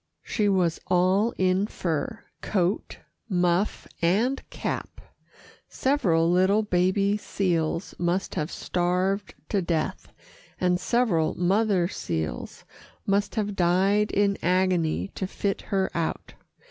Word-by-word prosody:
She 210 -4 0
was 180 -4 +1
all 185 +5 +3
in 185 +2 +2
fur 170 +4 -3 0.2
coat, 185 -1 -1 0.3
muff 180 +1 +1
and 220 +11 +2
cap. - - -4 0.7
Several 185 - +2
little 190 +4 +3
baby 195 +1 +2
seals 175 -4 -1
must 175 +2 0
have 155 +1 -2
starved 185 +3 -1
to 200 - +1
death, 170 -3 -2 0.5
and 180 -1 +2
several 195 -8 +1
mother 190 0 +2
seals 80 - -4 0.4
must 200 +1 0
have 205 -2 -1
died 195 +4 +3
in 200 0 +1
agony 180 -1 +1
to 190 - -3
fit 195 +1 -2
her 195 -2 +1
out. 165 -1 -3
185 Hz, 110 wpm, -26 LUFS, 175-205 Hz, 0.7 s, all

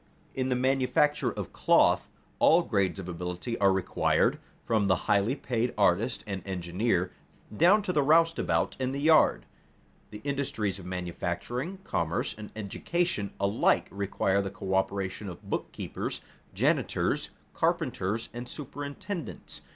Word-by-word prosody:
In 130 0 -1
the 125 - +2
manufacture 135 +3 +2
of - - -6
cloth - - +4 0.3
all 170 +2 +6
grades 100 - 0
of 95 -2 -6
ability 90 +6 -4
are 100 -1 +5
required, 95 -2 +1 0.3
from 110 -3 +2
the 95 - +4
highly 105 +5 +2
paid 120 -3 -2
artist - - +2
and 100 -2 -4
engineer, 90 +1 -1 0.4
down 190 - +5
to 180 - -1
the 150 - +3
roustabout 165 +3 +3
in 130 0 -1
the 140 - -3
yard. 155 +2 +4 0.6
The 105 - -8
industries 130 -9 -2
of 90 - -9
manufacturing, 90 - -3
commerce, 85 0 -1
and 105 -1 -9
education 110 - -1
alike 100 +2 +2
require 100 0 0
the 100 - -3
coöperation 95 +1 -2
of 85 - -11
bookkeepers, - - -4 0.3
janitors, - - +1 0.2
carpenters, 105 +5 -1
and 120 +1 -6
superintendents. 145 +5 -6
105 Hz, 130 wpm, -29 LUFS, 95-140 Hz, 0.6 s, all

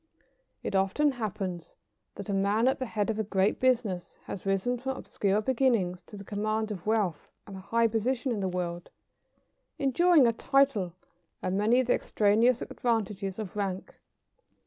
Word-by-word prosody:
It - - -3
often 195 +10 +2
happens 195 -7 -5 0.4
that 200 - -7
a 200 - -2
man 200 +4 +2
at 265 - +1
the 260 - -3
head 210 -1 -1
of 220 - -4
a - - +1
great 195 0 +1
business 235 -9 0
has 195 - -7
risen 195 +6 0
from 265 +1 -3
obscure 200 +1 0
beginnings 230 -8 +1
to 210 - -10
the 200 - -8
command 215 +2 -2
of 185 -2 -7
wealth 205 -8 0 0.2
and 200 - -9
a - - -7
high 230 +4 +1
position 235 +4 0
in 220 - -1
the 190 -1 -1
world, 175 -1 -4 0.9
enjoying 300 +2 +4
a 230 - +3
title 230 -9 +1 0.5
and 185 - -1
many 220 +5 +3
of - - -2
the 245 - +3
extraneous 225 +4 +2
advantages 205 -5 -2
of 210 -4 -6
rank. 195 -2 -3
210 Hz, 170 wpm, -29 LUFS, 195-245 Hz, 0.9 s, enjoying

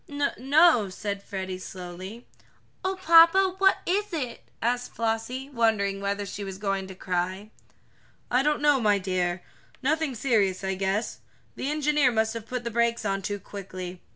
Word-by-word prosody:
"No 285 -1 -1
no," 275 - +5
said 200 +1 -4
Freddie 190 -2 -5
slowly. 185 +5 -8 0.6
"Oh, 380 +1 0
papa, 340 +2 +6
what 385 0 +5
is 410 +3 0
it?" 260 -8 -4 0.2
asked 245 +2 -1
Flossie, 230 +4 -2
wondering 215 -5 +1
whether 200 0 -2
she 200 +1 -6
was 195 -1 -6
going 195 -1 -2
to 190 - -9
cry. 185 +3 -3 0.8
"I 250 +1 +4
don't 295 +1 0
know, 290 -3 +4
my 210 -2 +4
dear. 185 -2 -1 0.4
Nothing 305 -1 0
serious, 210 -7 +1
I 190 0 -1
guess. 195 +3 -2 0.4
The 270 - -3
engineer 295 -3 +2
must 220 -1 +1
have 230 -1 -7
put 250 -1 -4
the 235 - -3
brakes 235 0 +1
on 195 -1 0
too 205 +2 -3
quickly. 185 -3 -8
220 Hz, 160 wpm, -26 LUFS, 195-275 Hz, 0.8 s, papa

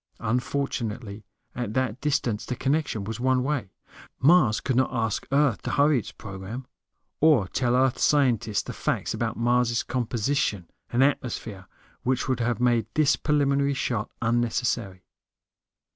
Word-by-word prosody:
Unfortunately, 120 -3 -2 0.3
at 115 -3 -4
that 130 -2 -1
distance, 125 -7 0
the 125 - -4
connection 135 -4 -1
was 110 +2 -5
one 130 0 +2
way. 130 -8 -2 0.5
Mars 135 -7 +5
could 130 - -1
not 130 +1 +3
ask 110 -4 -2
Earth 140 -5 +2
to - - -4
hurry 145 -1 +3
its - - -8
program. 100 +5 -8 0.5
Or 145 -11 +4
tell 125 +4 0
Earth 130 0 +2
scientists 120 -7 +2
the - - -7
facts - - -2
about - - -2
Mars' 120 0 +2
composition 120 - -1 0.2
and 125 +2 +3
atmosphere 115 -8 -2 0.3
which 130 0 0
would 130 -2 0
have 120 -1 0
made 120 -3 +2
this 155 -2 +4
preliminary 140 -2 +1
shot 120 -5 -2
unnecessary. 115 -4 0
125 Hz, 140 wpm, -26 LUFS, 110-135 Hz, 0.5 s, Mars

